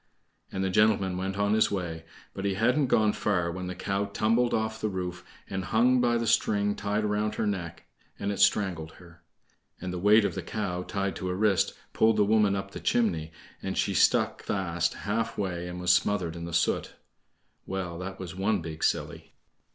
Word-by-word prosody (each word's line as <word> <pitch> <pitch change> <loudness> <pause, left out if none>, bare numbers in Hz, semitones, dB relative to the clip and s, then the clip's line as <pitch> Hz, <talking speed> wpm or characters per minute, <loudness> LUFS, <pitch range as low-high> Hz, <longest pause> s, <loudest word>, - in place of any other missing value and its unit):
And 95 - -2
the 95 - 0
gentleman 100 -2 +3
went 95 +1 -3
on 100 0 +2
his 110 - +4
way, 85 -4 -4 0.3
but 95 - -6
he 100 -1 0
hadn't 125 +7 +2
gone 110 -3 +3
far 90 -5 0
when 90 +1 -5
the 90 - -5
cow 100 +2 -1
tumbled 115 +4 +1
off 110 0 -1
the 110 - 0
roof, 90 -2 -4 0.2
and 95 -1 -4
hung 125 +4 +3
by 120 -1 +3
the 115 - -1
string 105 -2 +2
tied 105 +1 -1
round 105 +1 0
her - - -1
neck, 90 -5 -4 0.3
and 100 - -2
it 100 - -4
strangled 95 -6 +2
her. 85 -1 -17 0.6
And 90 -1 -5
the 90 - -3
weight 105 +3 +5
of - - -1
the - - -4
cow 95 -5 -3
tied 100 +1 -2
to 95 - -4
her 90 - -1
wrist 100 -1 +2 0.2
pulled 110 -1 +3
the 105 - +4
woman 105 -1 +3
up 95 0 -4
the - - -7
chimney, 85 -10 0 0.3
and - - -4
she - - +1
stuck - - +3
fast 85 -3 -1
half 110 +3 -2
way 90 -3 -2
and 90 0 -6
was 90 0 +3
smothered 90 -4 +1
in 85 0 -6
the 85 - -6
soot. 85 - 0 0.7
Well, 90 -3 -4
that 95 +1 -6
was 90 -2 -7
one 100 +2 +1
big 80 -1 -6
silly. - - -2
100 Hz, 200 wpm, -28 LUFS, 90-105 Hz, 0.7 s, weight